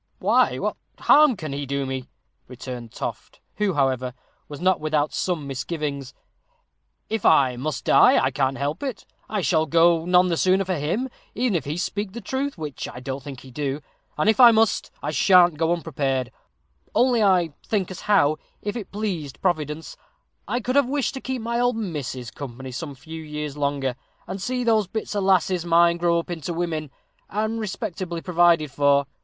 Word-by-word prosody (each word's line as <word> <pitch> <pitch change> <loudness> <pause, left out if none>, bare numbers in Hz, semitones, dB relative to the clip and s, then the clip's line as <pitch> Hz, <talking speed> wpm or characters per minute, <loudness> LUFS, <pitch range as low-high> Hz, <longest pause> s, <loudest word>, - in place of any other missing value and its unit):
"Why, - - +3
what - - -2 0.2
harm 295 -6 +5
can 155 -4 -5
he 140 0 -4
do 140 0 -1
me?" 130 -1 -5 0.4
returned 125 -2 -8
Toft, - - -6 0.2
who, 205 -4 0
however, 130 -3 0 0.3
was 145 - -8
not 185 +2 +2
without 155 -1 0
some 175 -6 -1
misgivings. 140 0 -4 0.9
"If 220 -2 -2
I 130 -3 +5
must 140 +3 -4
die, - - +6
I - - +2
can't 135 -1 0
help 145 +5 -2
it 265 -6 -5 0.2
I 210 -2 -1
shall 160 -3 +2
go 165 +1 +4
none 180 +1 +4
the 170 - 0
sooner 190 +2 +3
for 185 - -1
him, 175 - -1 0.3
even 245 -2 +1
if 155 - -1
he 150 +3 -3
speak 200 +2 -3
the 235 - -5
truth, 265 +4 -3
which 150 -4 -5
I 125 - -9
don't 135 +2 -5
think 135 -2 -9
he 130 - -13
do; 140 +1 -2 0.4
and 155 - +1
if 220 +3 +3
I 245 -2 +10
must, 225 -1 +2
I - - -1
sha'n't 175 -5 +5
go 165 0 +2
unprepared 135 -7 -1 0.6
only 245 -2 +4
I 180 -6 +3
think 195 -4 -1
as 185 - -7
how, 155 -8 +3 0.2
if 205 +1 -4
it 220 -6 -6
pleased 185 -10 -4
Providence, 155 -3 -2 0.5
I 245 - -1
could 250 +3 -2
have 280 -3 +3
wished 275 -4 0
to 265 - -6
keep 260 -3 -4
my 235 +1 -1
old 245 0 +2
missus 140 - -4
company 130 -1 -8
some 145 +2 -6
few 160 +4 -9
years 150 -2 -5
longer, 140 -3 -1 0.3
and 190 0 -6
see 250 +4 -1
those 220 -4 +2
bits 220 +3 -4
of 205 -1 -1
lasses 185 -2 +2
of 175 - -8
mine 170 0 +5
grow 170 0 +2
up 170 +1 -3
into 165 0 -4
women, 160 -3 -2 0.4
and 220 +2 -1
respectably 190 -5 -4
provided 170 -4 +3
for. 140 0 +3
170 Hz, 185 wpm, -24 LUFS, 140-205 Hz, 0.9 s, I